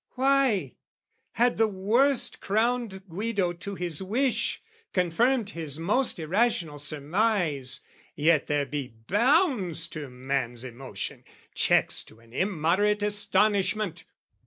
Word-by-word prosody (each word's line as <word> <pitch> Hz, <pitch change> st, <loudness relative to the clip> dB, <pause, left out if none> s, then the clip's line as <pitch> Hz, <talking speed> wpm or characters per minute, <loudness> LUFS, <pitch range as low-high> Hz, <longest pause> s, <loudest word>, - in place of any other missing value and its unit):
Why, 265 Hz, -5 st, +2 dB, 0.6 s
had 240 Hz, 0 st, +2 dB
the 225 Hz, -, +5 dB
worst 225 Hz, +7 st, +1 dB
crowned 220 Hz, -2 st, -1 dB
Guido 195 Hz, 0 st, -1 dB
to 195 Hz, +3 st, -7 dB
his 175 Hz, -4 st, -2 dB
wish, 240 Hz, +7 st, +1 dB, 0.3 s
Confirmed 210 Hz, +6 st, +1 dB
his 155 Hz, -5 st, -4 dB
most 210 Hz, +11 st, +1 dB
irrational 170 Hz, -3 st, 0 dB
surmise, 150 Hz, -, 0 dB, 0.3 s
Yet 155 Hz, 0 st, +3 dB
there 145 Hz, -1 st, +1 dB
be 135 Hz, -4 st, -5 dB
bounds 240 Hz, -, +2 dB
to 150 Hz, -3 st, -7 dB
man's 125 Hz, -2 st, -3 dB
emotion, 120 Hz, -5 st, -6 dB, 0.3 s
checks -, -, +2 dB
To 110 Hz, -, -17 dB
an 115 Hz, 0 st, -20 dB
immoderate 195 Hz, +5 st, +1 dB
astonishment. 205 Hz, -2 st, +1 dB
190 Hz, 110 wpm, -27 LUFS, 150-220 Hz, 0.6 s, the